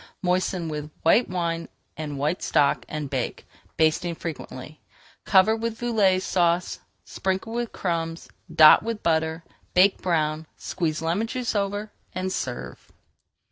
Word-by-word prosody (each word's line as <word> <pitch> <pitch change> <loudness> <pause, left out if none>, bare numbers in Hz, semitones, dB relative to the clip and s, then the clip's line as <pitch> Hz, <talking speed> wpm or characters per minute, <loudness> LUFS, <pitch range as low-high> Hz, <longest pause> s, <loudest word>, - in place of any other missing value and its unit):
Moisten 180 -1 0
with 150 -1 -5
white 195 +9 +4
wine 170 -2 -2 0.3
and 150 -2 -5
white 150 +6 -1
stock, 140 - +2
and 150 -1 -4
bake, 130 -3 -3 0.3
basting 160 +2 +2
frequently. 155 -2 -7 0.4
Cover 200 +3 +5
with 225 0 -4
Velouté 210 -6 +3
Sauce, 175 -1 +1 0.3
sprinkle 190 +4 -3
with 240 -1 -2
crumbs, 165 -2 -3 0.2
dot 155 -1 +8
with 225 -1 -4
butter, 160 0 0 0.3
bake 190 +2 +5
brown, 155 -3 0
squeeze 160 -3 -2
lemon 175 +8 0
juice 250 0 -2
over, 205 +1 -2 0.2
and 185 0 -2
serve. 125 -2 -5
170 Hz, 130 wpm, -25 LUFS, 155-195 Hz, 0.4 s, dot